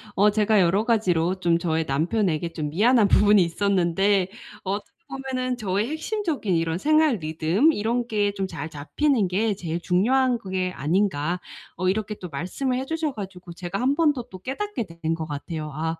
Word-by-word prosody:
어 205 +2 +5
제가 215 0 +3
여러 190 +4 +3
가지로 185 -6 +1
좀 170 -2 +2
저의 160 -2 0
남편에게 165 +3 0
좀 150 -2 -3
미안한 215 - +4
부분이 205 0 +5
있었는데. 190 +1 +1 0.4
어떻게 200 +2 -4 0.2
보면은 255 -2 -3
저의 205 +1 -1
핵심적인 315 - -2
이런 165 0 0
생활 305 - +3
리듬 165 - +2
이런 235 +3 -1
게 205 -2 +1
좀 195 -1 -3
잘 160 -2 -6
잡히는 210 - 0
게 205 +3 0
제일 170 -2 -4
중요한 245 +8 +2
그게 185 -3 -2
아닌가 175 0 0 0.4
어 185 +1 0
이렇게 210 +2 -1
또 180 - -6
말씀을 185 - -2
해 265 - -3
주셔 320 -1 -2
가지고 190 -5 -8
제가 175 +3 -5
1 270 +3 +2
번 320 -3 +3
더 250 -4 -5
또 185 - -9
깨닫게 270 - -3
되는 165 -1 -3
것 160 -1 -4
같아요. 155 +1 -5
아 160 +2 -2
195 Hz, 345 characters per minute, -24 LUFS, 170-240 Hz, 0.4 s, 어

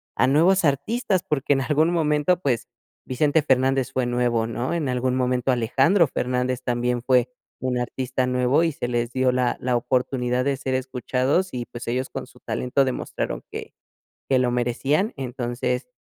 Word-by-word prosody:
a 130 - +3
nuevos 175 +8 +4
artistas, 185 - 0
porque 145 -1 +1
en 135 - 0
algún 155 +4 +2
momento, 155 +1 +2
pues, 130 -9 -1 0.4
Vicente 145 +4 +2
Fernández 135 -2 +2
fue 130 -1 0
nuevo, 120 -2 +1
¿no? 125 +7 -3
En 160 -5 -1
algún 125 0 0
momento 125 0 +1
Alejandro 135 - +3
Fernández 125 0 -1
también 120 0 0
fue 125 0 +3 0.3
un 130 -1 -1
artista 130 +1 -2
nuevo, 125 +4 +2
y 165 - +1
se 125 -5 -4
les 120 0 -1
dio 130 0 +2
la 125 -1 +1
la 125 0 0
oportunidad 125 0 0
de 140 - +1
ser 130 -1 -2
escuchados 130 +6 0
y, 120 -1 -3
pues, 120 0 -9
ellos 130 +2 -1
con - - -6
su - - -19
talento 135 +2 0
demostraron 130 - -3
que - - -7 0.6
que 130 - +3
lo 125 -1 +2
merecían. 135 - 0
Entonces, 125 -1 -3
130 Hz, 170 wpm, -23 LUFS, 125-140 Hz, 0.6 s, nuevos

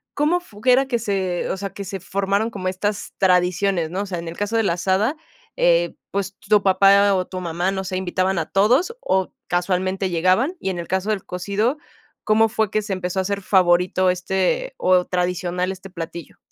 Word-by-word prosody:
¿Cómo 305 +5 +2
fu 215 -13 -16
g 245 - -8
era 265 +2 +4
que 245 - 0
se, 190 -5 -2
o - - -2
sea, 195 -1 -5
que 200 - -7
se 195 0 -6
formaron 200 +4 -1
como 190 -4 -3
estas 205 +2 -3
tradiciones, 180 -1 +2
no? 190 +3 -2
O - - -6
sea, 185 -3 -4
en 170 0 -6
el 165 - -9
caso 205 +2 -2
de 225 - +3
la 185 - +1
asada, 190 - +1 0.4
eh, - - +3 0.2
pues 200 -1 -2
t - - -21
tu 210 -1 +5
papá 200 +1 +5
o 185 -1 0
tu 185 - -6
mamá, 175 +2 -1
no 190 0 -3
sé, 185 0 -3
¿invitaban 185 0 0
a 160 - -4
todos 255 - +2
o 190 0 0 0.2
casualmente 185 +1 0
llegaban?, 185 - +2
y 190 - -2
en 175 - -5
el 170 - -6
caso 190 +3 -1
del 205 -3 -1
cocido, 200 +9 -1 0.5
¿cómo 220 +1 +4
fue 220 -2 0
que 215 - +1
se 205 -2 -4
empezó 185 0 -2
a - - +1
hacer 200 +1 -2
favorito 185 -1 +3
este 190 - 0
o 185 -1 +3
tradicional, 180 0 -1
este 190 +1 -12
platillo? 170 -2 -8
190 Hz, 210 wpm, -21 LUFS, 180-205 Hz, 0.5 s, tu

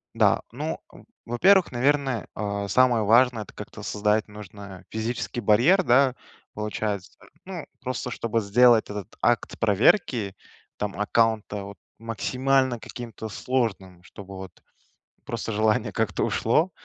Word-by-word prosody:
Да. - - +3
Ну, - - -4
в - - -16 0.2
во-первых, 185 +11 +4
наверное, 135 -1 +1
э, 100 -1 -3
самое 125 -2 +4
важное- 115 +1 +4
это - - -16
как-то - - -9
создать 105 +1 0
нужно 100 -2 -11
физический 115 +2 -3
барьер, 120 - +4
да, 130 -1 +4 0.4
получается. 105 -2 -4 0.3
Ну, 180 -4 -7 0.2
просто 125 -1 -4
чтобы 115 -1 -1
сделать 115 +2 +4
этот 105 -3 -7
акт - - +1
проверки 110 - +2 0.4
там 105 -1 -4
аккаунта 105 -1 +1
вот 100 -1 -10 0.2
максимально 130 +3 0
каким-то 115 -1 -8
сложным, 100 -7 -2
чтобы 95 +1 -11
вот 95 0 -11 0.6
просто 115 -1 -4
желание 110 0 +1
как-то - - -1
ушло, 155 +11 +1
110 Hz, 125 wpm, -25 LUFS, 105-125 Hz, 0.6 s, во-первых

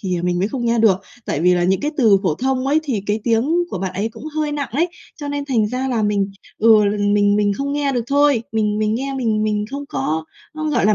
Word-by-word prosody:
thì, 185 -3 -2
à, - - -7
mình 175 0 0
mới 190 +3 0
không 250 0 -4
nghe 235 0 +1
được, 220 -4 +5 0.3
tại 145 - -1
vì 180 +2 +4
là 175 0 +1
những 190 +1 +2
cái 295 - -1
từ 220 -8 +5
phổ 180 -6 +1
thông 260 - -1
ấy 295 +3 +3
thì 260 -9 -2
cái 210 +1 0
tiếng 235 +4 +1 0.2
của - - -3
bạn 190 0 -3
ấy 200 +4 -1
cũng - - -11
hơi 305 -1 0
nặng 285 -2 -3
ấy, 325 +8 +1 0.3
cho 290 -2 -6
nên 285 0 -3
thành 240 -6 +1
ra 255 +3 -2
là 235 -4 0
mình 205 -1 0 0.3
ừ, 215 -1 +6
l 205 +1 +1 0.2
mình 205 0 +3
mình 205 -1 +2
không 280 +7 -3
nghe 285 -1 0
được 240 -3 -1
thôi. 285 -3 +3
Mình 210 -1 0
mình 215 0 +1
nghe 270 +3 -3
mình 225 -5 0
mình 210 -1 0
không 280 +1 -5
có 155 +4 -2 0.3
có, 310 0 -4
gọi 240 -8 +2
là, 215 - +4
225 Hz, 275 wpm, -20 LUFS, 205-275 Hz, 0.3 s, ừ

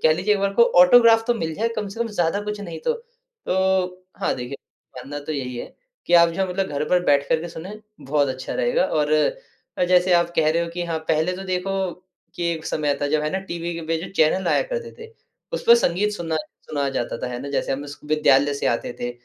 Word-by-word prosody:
कह 155 - +5
लीजिए 210 +5 +1
एक 200 - -2
बार 200 0 0
को 235 - +6 0.2
ऑटोग्राफ 225 +4 +7
तो 240 - +2
मिल 160 -7 -3
जाए 230 +5 0
कम 210 -1 -2
से 200 +4 -8
कम 235 - 0
ज़्यादा 180 -1 0
कुछ 210 0 -5
नहीं 170 -5 -6
तो। - - +2
तो 190 - -2 0.2
हाँ, - - +1
देखिए 125 +2 -6 0.4
मानना 140 +3 -6
तो 155 - -4
यही 125 -4 -4
है - - -8 0.3
कि 175 - +3
आप 170 0 +7
जो 190 +3 -1
मतलब 190 +1 -1
घर 145 +1 -2
पर 180 0 +2
बैठ 140 -1 +3
कर 160 - +2
के 170 - -6
सुनें 190 +6 -9 0.2
बहुत 145 0 +1
अच्छा 130 0 -5
रहेगा - - +1
और 150 -1 0 0.8
जैसे 180 0 +4
आप 170 0 +3
कह 155 -1 +4
रहे 170 +2 +1
हो - - -6
कि 175 - -2
हाँ, 165 -1 -2
पहले 160 +2 0
तो 190 - -7
देखो 190 0 -1 0.4
कि 175 -1 -2
एक 160 -1 -6
समय 150 -2 0
था - - +2
जब 155 0 +1
है 150 - -1
ना 190 - 0
टीवी 170 0 -3
के 170 - -5
पे 165 0 0
जो - - -7
चैनल 175 +4 +3
आया - - +3
करते 480 -2 -5
थे। 455 0 -10 0.4
उसपे 475 -1 +5
संगीत 210 - +1
सुना 165 -5 -3 0.3
सुनाया 140 -2 -1
जाता 120 -3 -3
था - - -1
है 120 - -5
ना 140 - -6
जैसे 140 - -1
हम 140 +2 -4
स 145 - -9
विद्यालय 145 -2 +3
से 140 - -2
आते 120 +1 -1
थे 120 - -2
170 Hz, 240 wpm, -22 LUFS, 150-200 Hz, 0.8 s, ऑटोग्राफ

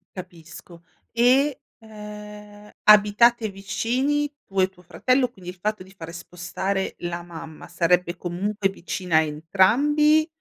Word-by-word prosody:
Capisco. 170 -1 -11 0.3
E, 255 +4 +3 0.2
ehm, 210 -1 -11
abitate 210 +2 +5
vicini, 255 +9 -1
tu 195 0 -4
e 185 - +2
tuo 185 -1 -21
fratello? 255 +8 +1
Quindi, 185 -7 -11
il 185 - -17
fatto 210 -1 -2
di 190 - -17
fare 165 -3 -9
spostare 180 +3 -4
la 175 0 -4
mamma, 165 -2 -10
sarebbe 175 0 +1
comunque 195 +4 -2
vicina 180 -3 -2
a - - +6
entrambi 265 - +3
195 Hz, 125 wpm, -24 LUFS, 175-230 Hz, 0.3 s, a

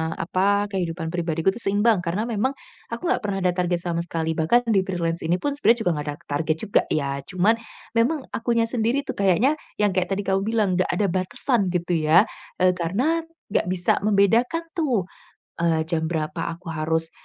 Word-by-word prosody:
apa, 200 +4 +1
kehidupan 170 -4 -2
pribadiku 165 0 0
tuh 235 - -5
seimbang 205 +1 +3
karena 180 +6 -1
memang 240 +4 0 0.4
aku - - -5
enggak - - +1
pernah 200 -2 -1
ada 180 -1 +2
target 180 -1 +1
sama 170 -1 -1
sekali 165 -1 -2
bahkan 165 +10 +4
di 200 -4 +4
freelance 170 -2 -2
ini 170 +2 +2
pun 285 - 0
sebenarnya 235 -4 +4
juga 175 - +3
gak 145 - -8
ada 145 - -3
target 155 +2 0
juga 210 - +3
ya, 140 -2 -1
cuman 185 +7 +2 0.4
memang 255 +7 +3
akunya 230 0 +1
sendiri 240 +4 0
tuh - - -2
kayaknya 200 - +3 0.3
yang 205 -1 +3
kayak 180 -1 +1
tadi 200 +1 -1
kamu 195 0 +2
bilang, 220 -2 +1
"Enggak 185 - +1
ada 200 +4 +1
batasan" 190 +3 0
gitu 175 0 -1
ya, 170 +5 +7 0.4
eee 185 0 +5
karena 240 - 0 0.3
enggak - - +1
bisa 180 -1 +1
membedakan 225 - +3
tuh, 255 - +1 0.6
eee, 165 -2 +2
jam 160 -1 0
berapa 160 0 -2
aku 170 0 -10
harus, 160 +1 0
185 Hz, 185 wpm, -24 LUFS, 170-220 Hz, 0.6 s, ya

